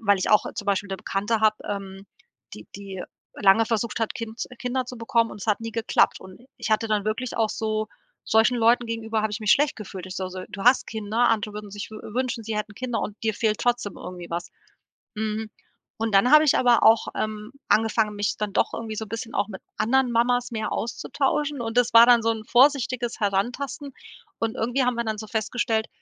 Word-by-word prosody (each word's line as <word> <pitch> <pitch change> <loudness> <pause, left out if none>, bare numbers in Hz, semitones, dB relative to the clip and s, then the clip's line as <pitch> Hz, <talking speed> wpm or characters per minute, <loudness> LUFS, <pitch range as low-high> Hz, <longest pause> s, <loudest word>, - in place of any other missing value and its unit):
weil 200 -3 +3
ich 185 - -1
auch 210 - +5
zum 205 - -6
Beispiel 200 0 0
'ne 195 - -3
Bekannte 205 +5 -1
hab, 215 -1 +4
ähm, 195 -1 -6 0.5
die - - -12
die 195 -2 -7 0.3
lange 205 +3 +4
versucht 230 0 -2
hat, 225 - -1
Kind 230 0 -7
z - - -4
Kinder 255 +1 -2
zu 250 -1 -8
bekommen, 230 0 +1
und - - -10
es - - -6
hat 210 - +2
nie 225 0 -6
geklappt. 230 0 +2
Und 190 +4 -13 0.2
ich - - -4
hatte 220 +1 +2
dann 210 -2 0
wirklich 230 +4 -3
auch 225 -1 +2
so 215 -1 -2 0.4
solchen 225 +3 +3
Leuten 235 +1 +3
gegenüber 225 -1 -2
habe 215 - 0
ich 205 - -3
mich 215 - +4
schlecht 295 0 +2
gefühlt. 190 -3 -8
Ich 185 - -7
so 185 -1 -3
so: 185 0 -7
„Du 195 - -6
hast 250 +2 +5
Kinder, 220 +2 0
andere 215 -1 -1
würden 210 -1 -7
sich 205 +2 -7
wü 215 - -7 0.2
wünschen, 250 -2 -1
sie 220 0 -3
hätten 210 0 -4
Kinder, 245 +1 -3
und 210 - -5
dir 220 -1 +1
fehlt 215 -1 0
trotzdem 240 -5 0
irgendwie 180 -1 -9
was.“ 170 0 -4 0.7
Hm, 215 0 -2 0.5
und 225 -1 -1
dann 195 +6 +5
habe 305 0 +8
ich 295 - +4
aber 245 -2 +4
auch, 225 0 +5
ähm, 215 +1 -4 0.2
angefangen, 220 -1 +2
mich 205 -1 -1
dann 210 -1 -2
doch - - +2
irgendwie 220 -1 -5
so 220 - -3
’n - - -17
bisschen 230 +1 -5
auch 200 +1 0
mit 190 -3 -8 0.2
anderen 250 +3 +2
Mamas 245 +1 +2
mehr 220 -1 -3
auszutauschen, 280 +4 -1
und 225 +1 -4
das 245 -1 +2
war 230 +1 +10
dann 240 -1 +6
so 230 - +2
'n 220 -1 -3
vorsichtiges 255 -2 +2
Herantasten, 245 +8 -2 0.5
und 225 -1 -1
irgendwie 245 +4 0
haben 250 0 +1
wir 235 - -1
dann 220 -1 -3
so 215 - -6
festgestellt 220 0 -1
220 Hz, 220 wpm, -24 LUFS, 210-240 Hz, 0.7 s, war